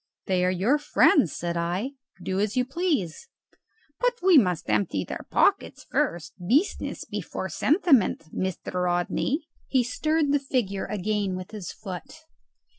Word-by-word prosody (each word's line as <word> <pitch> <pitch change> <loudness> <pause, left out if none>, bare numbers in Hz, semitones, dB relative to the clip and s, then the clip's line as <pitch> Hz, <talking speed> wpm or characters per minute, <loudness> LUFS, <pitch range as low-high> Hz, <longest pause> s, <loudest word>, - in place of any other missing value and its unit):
"They 185 -1 +1
are 180 - +3
your 210 +11 +2
friends," 285 - +4
said 170 0 -3
I; 175 +9 -1 0.3
"do 190 +1 -1
as 210 +3 0
you 250 - +3
please." 280 - -2 0.7
"But - - +2
we 370 -2 +6
must 180 - +3
empty 105 -2 +1
their - - -7
pockets - - +2
first. 170 -2 -1
Business 275 - 0
before - - -5
sentiment, 300 - +3
Mr. 180 -1 -2
Rodney." 175 - 0 0.2
He 260 -2 +2
stirred 305 +4 0
the 290 - +3
figure 240 -8 -1
again 205 -1 -1
with 185 0 -7
his 210 -5 -6
foot. 195 - -8
210 Hz, 140 wpm, -26 LUFS, 180-285 Hz, 0.7 s, we